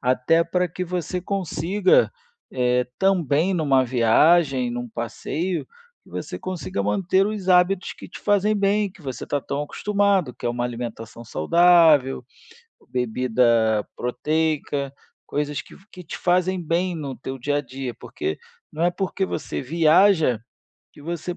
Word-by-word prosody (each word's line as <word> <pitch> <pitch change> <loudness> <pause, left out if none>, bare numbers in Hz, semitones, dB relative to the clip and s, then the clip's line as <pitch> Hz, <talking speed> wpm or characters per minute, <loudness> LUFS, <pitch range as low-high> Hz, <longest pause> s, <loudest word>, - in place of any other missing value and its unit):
Até 130 +6 +2
pra 180 +2 0
que 180 +2 -4
você 180 0 -3
consiga, 190 0 +1 0.4
eh, 125 -1 +1
também 180 -2 +2
numa 140 -6 +3
viagem, 130 +2 +3
num 120 0 -5
passeio, 155 +10 -3 0.4
que - - -21
você - - -6
consiga 175 - -4
manter 190 - +1
os 210 -3 -4
hábitos 180 +1 +3
que - - -11
te - - -11
fazem 205 +1 +2
bem, 200 0 +1
que 195 - -19
você 130 -5 -6
está 145 - -2
tão 140 +2 -3
acostumado, 200 - 0
que - - -13
é - - +1
uma 120 0 -2
alimentação 115 -1 -6
saudável, 155 - +4 0.7
bebida 115 -3 +2
proteica, 145 +1 -1 0.3
coisas 145 0 -2
que - - -14 0.2
que 180 -2 -11
te 160 - -7
fazem 180 0 +1
bem 175 +3 0
no 140 -5 -5
teu 130 +2 -6
dia 145 +4 -1
a - - +1
dia 130 -1 -6
porque 380 +1 -5 0.3
não 165 +2 -1
é 175 - +4
porque 190 +1 -2
você - - -4
viaja 160 - +4 0.5
que - - -16
você 170 +2 -4
155 Hz, 145 wpm, -23 LUFS, 125-180 Hz, 0.7 s, saudável